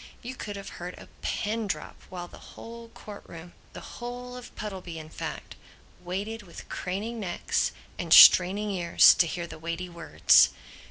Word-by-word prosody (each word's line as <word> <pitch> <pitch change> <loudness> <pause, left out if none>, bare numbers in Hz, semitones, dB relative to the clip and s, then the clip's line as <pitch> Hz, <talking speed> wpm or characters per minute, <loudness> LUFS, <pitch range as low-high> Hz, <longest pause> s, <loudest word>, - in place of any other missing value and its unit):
You 250 +2 -6
could 210 -5 -7
have 200 -1 -8
heard 180 +1 -6
a - - -13
pin 220 +1 -2
drop 155 -5 -4
while 175 -1 -7
the - - -14 0.2
whole 230 0 -10
court 210 -2 -11
room, 170 +1 -11 0.2
the - - -10
whole 245 +1 -7
of 250 -1 -9
Puddleby 185 -5 -7
in 155 -1 -9
fact, - - -7 0.5
waited 200 +6 -4
with 180 -4 -12
craning 210 +6 -4
necks 180 -4 -1 0.3
and - - -5
straining 200 +4 +8
ears 175 -3 +6
to 170 - +2
hear 170 +1 -4
the 170 - -11
weighty 170 +2 -5
words. 160 - +4
185 Hz, 165 wpm, -27 LUFS, 175-220 Hz, 0.5 s, straining